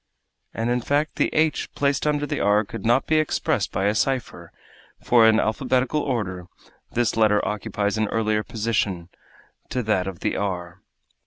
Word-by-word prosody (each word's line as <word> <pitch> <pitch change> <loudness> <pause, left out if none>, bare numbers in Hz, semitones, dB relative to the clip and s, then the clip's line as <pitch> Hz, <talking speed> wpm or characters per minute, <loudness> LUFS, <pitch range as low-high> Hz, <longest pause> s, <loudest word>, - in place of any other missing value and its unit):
And 115 +2 -2
in 125 0 +1
fact 145 +5 -1
the - - +2
h 155 0 0
placed 140 +1 0
under 145 -1 +1
the - - -3
r 105 +1 +3
could - - -8
not 120 +3 +3
be 155 - +2
expressed 155 - 0
by 95 +2 -1
a 105 - +2
cipher, 130 +3 -2 0.5
for, 115 -2 +5
in 110 0 +5
alphabetical 130 +5 0
order, 95 -10 -3 0.4
this 120 -2 0
letter 110 -2 +3
occupies 105 0 -2
an 110 - +1
earlier 110 -1 0
position 105 -6 -2 0.6
to 125 0 -2
that 100 -4 0
of 95 -3 -7
the - - 0
_r. 90 -3 -3
110 Hz, 165 wpm, -23 LUFS, 100-130 Hz, 0.6 s, for